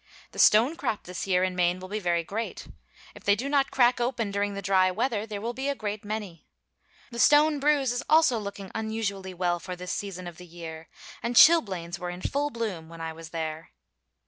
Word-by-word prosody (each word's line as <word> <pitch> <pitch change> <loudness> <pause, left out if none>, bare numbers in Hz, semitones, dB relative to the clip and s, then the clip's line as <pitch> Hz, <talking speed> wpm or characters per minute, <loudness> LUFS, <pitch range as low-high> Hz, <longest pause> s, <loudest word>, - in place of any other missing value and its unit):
The - - -9
stone 235 +9 +5
crop 245 -9 -3
this 180 +2 -6
year 185 -1 +2
in 185 -1 -1
Maine 180 0 +1
will 185 - -8
be 210 +3 -3
very 175 -3 0
great. 220 +7 -5 0.5
If - - -14
they 200 - +4
do 245 +7 -4
not 280 -1 +2
crack 245 -2 +3
open 235 -4 -1
during 200 0 -1
the 200 - -4
dry 185 0 +3
weather, 220 +2 -1
there 210 -2 -5
will 230 +3 -3
be 265 +3 -3
a 280 - -1
great 210 -3 -4
many. 205 -6 -6 0.6
The 235 - -6
stone 295 +3 +5
bruise 280 -3 +2
is 245 - -2
also 310 -7 +5
looking 200 -2 -7
unusually 210 -4 -3
well 175 -1 0
for 180 +1 -6
this 180 0 -6
season 190 -3 -5
of 175 -2 -8
the 180 - -12
year, 165 -1 -9 0.3
and 235 +1 -3
chilblains 195 - +5
were 180 - -4
in 175 +1 -7
full 290 +1 0
bloom 210 - -4
when 165 0 -11
I 165 0 -4
was 165 0 -11
there. 160 -1 -5
200 Hz, 215 wpm, -27 LUFS, 180-240 Hz, 0.6 s, stone